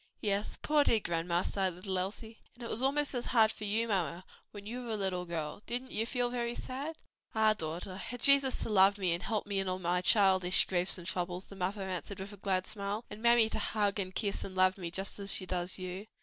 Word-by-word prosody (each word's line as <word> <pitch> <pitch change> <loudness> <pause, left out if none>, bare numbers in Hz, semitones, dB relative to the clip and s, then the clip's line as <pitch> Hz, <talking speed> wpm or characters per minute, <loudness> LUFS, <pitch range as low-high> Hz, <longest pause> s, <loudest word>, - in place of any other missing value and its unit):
"Yes, 205 0 -1
poor 300 -1 +4
dear 230 - +3
grandma!" 170 -1 -1
sighed 190 -2 0
little 185 +1 -2
Elsie. 220 +4 -5 0.2
"And 240 - -11
it 235 - -4
was 230 - 0
almost 285 +2 +1
as 245 -2 -2
hard 220 -2 +4
for 215 - -6
you, 220 +3 +1
mamma, 180 -4 -1 0.2
when 205 -1 -10
you 240 +4 -5
were 235 -2 -4
a - - -1
little 185 -3 -1
girl: 165 +1 -4
didn't 250 +2 -3
you 225 +1 -1
feel 245 -1 0
very 240 -1 -2
sad?" 280 +7 -5 0.4
"Ah, 220 0 +5
daughter, 170 0 -5
I - - -8
had 245 +4 -6
Jesus 275 0 +5
to - - -4
love 200 -1 +5
me, 185 -4 +2
and 170 - -2
help 215 -3 -1
me 200 -1 -1
in 190 -1 0
all 185 - -1
my 180 0 0
childish 190 -2 +4
griefs 180 0 +1
and 175 - -9
troubles," 180 0 -3
the 200 - -12
mother 195 +2 -2
answered, 185 +1 -5
with 195 +2 -7
a - - -11
glad 185 -1 0
smile; 210 +1 -4
"and 215 - -8
mammy 235 -1 +5
to - - -2
hug 205 -1 0
and 185 -1 -4
kiss 200 -3 -1
and 190 - -7
love 185 0 +4
me 175 -4 -5
just 195 +4 -4
as 200 0 -1
she 185 - +1
does 180 0 -1
you." 185 +2 -6
200 Hz, 245 wpm, -32 LUFS, 185-225 Hz, 0.4 s, Ah